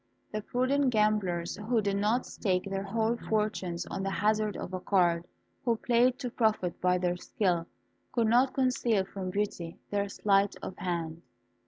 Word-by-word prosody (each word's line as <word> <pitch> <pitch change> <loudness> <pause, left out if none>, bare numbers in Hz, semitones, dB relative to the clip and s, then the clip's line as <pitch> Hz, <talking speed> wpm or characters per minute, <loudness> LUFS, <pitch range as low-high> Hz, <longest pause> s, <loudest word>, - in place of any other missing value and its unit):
The 215 - -2
prudent 255 +5 +1
gamblers, 210 -6 +1
who 220 +3 0
did 200 -1 0
not 215 +5 +1
stake 185 -4 -1
their 195 0 -2
whole 220 +3 0
fortunes 210 -5 -1
on - - -4
the 195 - -1
hazard 210 +1 +1
of 180 - -6
a 185 - -2
card, 175 -3 +2
and - - -41
who 235 -2 +2
played 245 +2 +3
to 250 -3 -4
profit 215 -7 0
by 180 0 +3
their 180 0 0
skill, 175 -3 0 0.4
could 235 -2 +2
not 245 +4 +3
conceal 245 -6 +2
from 190 -1 -5
Beauty 185 -4 -3
their 200 0 0
sleight 200 0 +2
of - - -5
hand. 170 -2 -3
205 Hz, 170 wpm, -30 LUFS, 180-225 Hz, 0.4 s, played